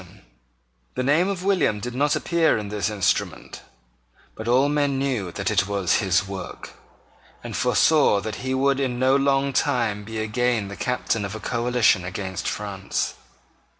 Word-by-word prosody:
The 130 - -1
name 150 +7 +3
of 195 -2 -3
William 185 - +2
did 120 +3 -5
not 145 +3 +1
appear 170 -5 +2
in 105 -1 -5
this 105 0 -1
instrument: 100 -5 -2 0.7
but 110 - -8
all 130 +4 +4
men 145 -2 +1
knew 125 -10 -1
that - - -2
it 95 - +2
was 100 -3 +1
his 95 0 +1
work, 95 -2 -7 0.7
and - - -6
foresaw 150 -10 +3
that 110 +1 -5
he 130 +1 -2
would 135 +1 +2
in 130 -3 -1
no 130 +2 +3
long 140 0 +2
time 115 -7 0
be 110 +1 -7
again 110 -1 0
the 100 - -7
captain 125 -3 -1
of 100 +1 -5
a - - -6
coalition 120 -4 +2
against 95 0 -5
France. 100 -2 -3
120 Hz, 160 wpm, -23 LUFS, 100-135 Hz, 0.7 s, all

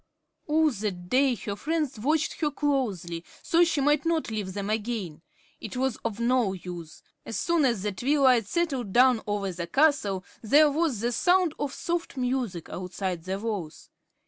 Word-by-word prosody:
All 310 0 +3
that 195 -6 -4
day 260 -1 +3
her 205 -1 -5
friends 300 -1 -2
watched 310 +8 0
her 300 - +2
closely, 225 - -1 0.2
so 340 +1 +4
she 330 -4 +1
might 295 +1 +3
not 330 -6 0
leave 205 -4 -3
them 200 -1 -3
again. 210 -7 -3 0.4
It 220 +3 -7
was 260 -2 0
of 225 -2 -4
no 235 -4 +2
use. 175 -3 -9 0.2
As 225 - -5
soon 335 +1 +2
as 235 -7 +1
the 210 - 0
twilight 255 0 +3
settled 270 - -1
down 250 -2 +5
over 205 -2 -1
the 170 -1 -5
castle, 210 - +2 0.2
there 290 +6 +5
was 295 -7 0
the 240 +1 0
sound 355 +5 +3
of 290 - -2
soft 340 -2 -3
music 250 -9 -2
outside 180 -1 -4
the 190 +1 -2
walls. 200 -7 -5
240 Hz, 170 wpm, -27 LUFS, 195-290 Hz, 0.4 s, down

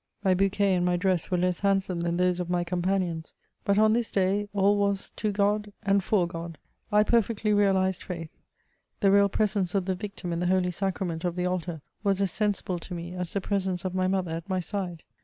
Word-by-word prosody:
My 190 - +4
bouquet 195 +1 +2
and 180 -1 +1
my 180 0 +2
dress 185 -2 +1
were 180 - +1
less 180 0 +1
handsome 195 -3 +1
than 170 0 -1
those 180 0 +2
of 175 -1 -3
my 175 -1 +1
companions; 175 -2 -1 0.3
but 200 0 +2
on 215 0 +5
this 235 0 0
day 200 +2 +1
all 200 0 +3
was 200 -1 0
to 215 -1 0
Grod 205 +1 0
and 200 -2 +2
for 185 -4 +2
Gfod. 170 -1 -6 0.4
I 210 0 +5
perfectly 220 -1 +1
realized 190 -2 +2
faith: 165 -3 -6 0.7
the 195 -2 +5
real 200 0 +5
presence 200 -3 0
of 195 -2 +1
the 190 - 0
Victim 185 -2 -5
in 170 - -2
the 180 - 0
Holy 180 0 +2
Sacrament 180 -3 -2
of 175 -1 -1
the 180 0 -1
altar, 175 -4 -3 0.2
was 200 -2 +2
as 195 -3 +1
sensible 200 -4 -1
to 180 +2 -7
me, 170 +1 -6
as 180 -2 -4
the 200 - 0
presence 190 -2 -1
of 185 - -2
my 185 0 +1
mother 185 -3 0
at 165 +3 -5
my 185 -1 +1
side. 180 -3 -4
190 Hz, 215 wpm, -27 LUFS, 180-200 Hz, 0.7 s, on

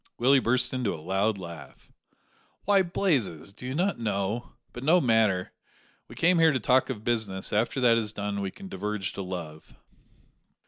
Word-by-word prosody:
Willie 135 +3 +5
burst 125 +1 +1
into 125 -5 -1
a - - -9
loud 95 +6 0
laugh. 85 -4 -11 0.7
"Why, 200 -1 +4
Blazes, 140 - -1
do 125 - -9
you 130 - -3
not 185 +1 0
know? 105 +1 -2 0.2
But, 125 - -7
no 165 +6 +5
matter; 110 - +2 0.6
we - - -12
came 175 +1 +3
here 165 -1 +6
to 130 - 0
talk 130 +4 +2
of 110 -5 -5
business; 110 -5 -1
after 115 +5 +1
that 120 -2 +5
is 105 -2 -3
done 100 -1 -3
we 100 - -2
can 195 - -11
diverge 105 - -4
to - - -5
love." 85 -4 -7
110 Hz, 175 wpm, -27 LUFS, 100-130 Hz, 0.7 s, here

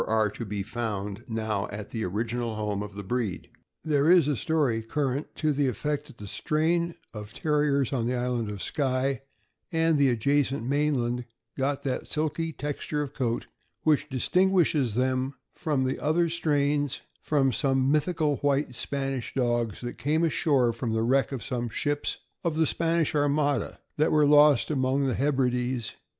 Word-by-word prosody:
ire 110 -2 +2
to 115 - -6
be 100 -1 -3
found 105 -2 -4
now 110 -3 -2
at 105 0 -7
the 110 -2 -3
original 115 +4 -2
home 105 -2 -2
of 105 -1 -7
the 100 - -6
breed. 110 -2 -3 0.3
There 150 -1 +2
is 175 -5 +6
a 145 - +1
story 145 -6 +1
current 135 +4 -2
to 155 -1 +1
the 140 0 +1
effect 145 +5 -2
that - - -14
the 105 - -9
strain 165 - 0 0.2
of 105 -1 -8
Terriers 145 -3 +1
on 120 -3 0
the 125 - 0
island 120 -3 -1
of 100 -4 -5
Skye, 135 -1 0 0.5
and 165 -2 +2
the 140 -1 +5
adjacent 135 +1 +1
mainland, 130 -4 0 0.3
got 140 +1 -1
that 130 -3 -2
silky 160 +1 0
texture 150 0 -3
of 140 -1 -7
coat 120 -3 -1 0.4
which 155 -2 +2
distinguishes 155 - +2
them 130 +2 0 0.2
from 150 -6 -1
the 130 0 -1
other 165 +3 +2
strains 145 -4 0 0.2
from 140 -3 +2
some 135 +1 +1
mythical 155 -1 +1
white 140 -2 0
Spanish 135 0 -3
dogs 120 -4 0
that 120 0 -6
came 155 +4 +1
ashore 140 -7 +2
from 115 -1 -3
the 110 0 +1
wreck 135 +4 +2
of 130 -6 -4
some 120 0 -3
ships 145 +6 -1 0.3
of 165 -2 -1
the 160 - +4
Spanisli 165 -1 +1
armada 145 0 +1 0.2
that 155 +1 +3
were 150 -1 +5
lost 145 -1 +5
among 135 0 +1
the 130 - +1
Hebrides. 125 -3 0
135 Hz, 165 wpm, -27 LUFS, 120-150 Hz, 0.5 s, is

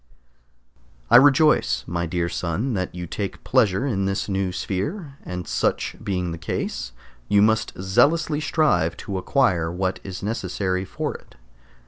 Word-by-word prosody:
I - - +10
rejoice, 135 - +4
my 85 0 -2
dear 85 +1 -1
son, 90 +9 -2
that 90 -3 -3
you 90 0 -5
take 100 +3 -5
pleasure 125 -2 +2
in 100 -8 0
this 95 +1 -1
new 95 -2 -1
sphere, 135 - -4
and 90 -1 -6
such - - 0
being 90 -3 -2
the 85 - -6
case 60 -7 -3 0.4
you 100 0 +5
must 110 -2 +1
zealously 150 - +2
strive 90 - +1
to 95 -2 -3
acquire 90 - +1
what 95 +1 -2
is 95 -1 -7
necessary 95 -3 -2
for - - -3
it. - - -14
95 Hz, 145 wpm, -23 LUFS, 90-120 Hz, 0.4 s, I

